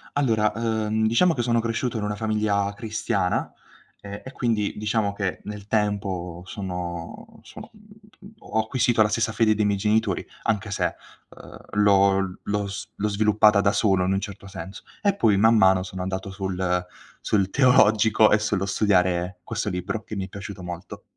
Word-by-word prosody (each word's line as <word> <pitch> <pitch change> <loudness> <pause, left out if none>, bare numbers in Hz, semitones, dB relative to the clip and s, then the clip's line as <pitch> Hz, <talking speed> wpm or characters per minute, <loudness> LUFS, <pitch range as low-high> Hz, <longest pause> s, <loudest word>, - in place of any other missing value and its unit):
Allora, 110 -7 +2
uhm, 110 -1 0
diciamo 165 +11 +3
che 125 - -2
sono 120 0 +1
cresciuto 115 +1 -2
in 105 - -3
una 105 0 -2
famiglia 105 -2 0
cristiana, 105 -4 -1 0.5
e 100 0 -8
e 130 - -9
quindi 115 -6 -1
diciamo 105 -1 0
che 100 -2 -3
nel 105 -1 -7
tempo 95 -5 -2
sono 90 -3 -6
sono - - -12
mhmm, 210 -1 -18
ho 110 - -2
acquisito 120 0 +1
la 105 - +5
stessa 115 +1 0
fede 110 -1 +2
dei 105 0 +1
miei 100 -1 +1
genitori, 105 -2 +1 0.2
anche 105 -1 -1
se, 100 - -1 0.3
uhm, - - -13 0.2
l'ho 95 -2 +3
l'ho 100 0 -2
s 100 - -7
l'ho 105 - 0
sviluppata 105 0 +4
da 100 0 +3
solo 95 -4 +2
in 95 - +1
un 95 - +1
certo 100 -1 -8
senso. 95 0 -9 0.2
E 200 -1 +2
poi 110 - +3
man 115 +2 +5
mano 95 -2 +5
sono 95 0 -6
andato 95 +1 -4
sul 95 -2 -2 0.3
sul 100 -3 0
teologico 110 -4 +4
e 105 - +6
sullo 100 -2 -1
studiare 90 -3 +1
questo 105 - -3
libro 90 +4 -4
che 110 - -7
mi 95 -1 -3
è - - -9
piaciuto 100 -1 -8
molto. 90 0 -8
105 Hz, 175 wpm, -24 LUFS, 95-110 Hz, 0.5 s, e